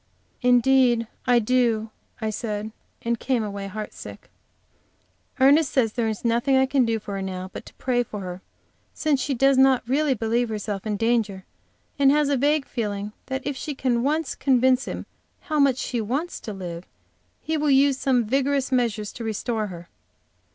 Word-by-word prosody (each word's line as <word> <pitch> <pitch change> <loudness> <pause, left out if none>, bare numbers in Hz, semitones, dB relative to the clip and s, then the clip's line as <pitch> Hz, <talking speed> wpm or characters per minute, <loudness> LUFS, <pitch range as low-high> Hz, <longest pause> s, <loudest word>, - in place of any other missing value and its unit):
"Indeed 250 -1 +4 0.2
I 245 -1 +5
do," 230 -2 +1 0.3
I 220 0 -1
said, 215 0 -4 0.3
and 235 -1 -1
came 250 -4 0
away, 200 -1 -5
heartsick. 210 +2 -8 1.1
Ernest 280 +3 +5
says 230 -5 +1
there 235 -2 0
is 220 +1 -4
nothing 240 +4 +2
I 265 - +4
can 265 -1 +2
do 225 -1 0
for 205 -1 -7
her 195 - -3
now 185 -1 -5
but - - -8
to - - -13
pray 250 -2 0
for 215 -3 -6
her, 180 0 -6 0.5
since 295 -4 +1
she 280 - -1
does 270 +1 +4
not 265 -3 +4
really 275 +1 +2
believe 230 +1 0
herself 210 -1 -4
in 210 -1 -1
danger, 220 -4 0 0.5
and 275 -1 +6
has 295 0 +3
a 285 - +2
vague 290 +2 +2
feeling 210 -3 -3 0.2
that 265 0 -4
if 285 0 -2
she 295 +2 -5
can 250 -3 0
once 300 +3 0
convince 260 -1 +2
him - - -5 0.4
how 310 -4 -2
much 275 -3 +4
she 240 -1 -2
wants 275 - -3
to 215 - -7
live, 180 -3 -7 0.5
he 320 - -2
will 300 -1 +1
use 275 0 +4
some 250 -4 +2
vigorous 275 +3 0
measures 230 -5 0
to 235 - -7
restore 220 0 -2
her. 175 -3 -9
245 Hz, 180 wpm, -24 LUFS, 215-270 Hz, 1.1 s, and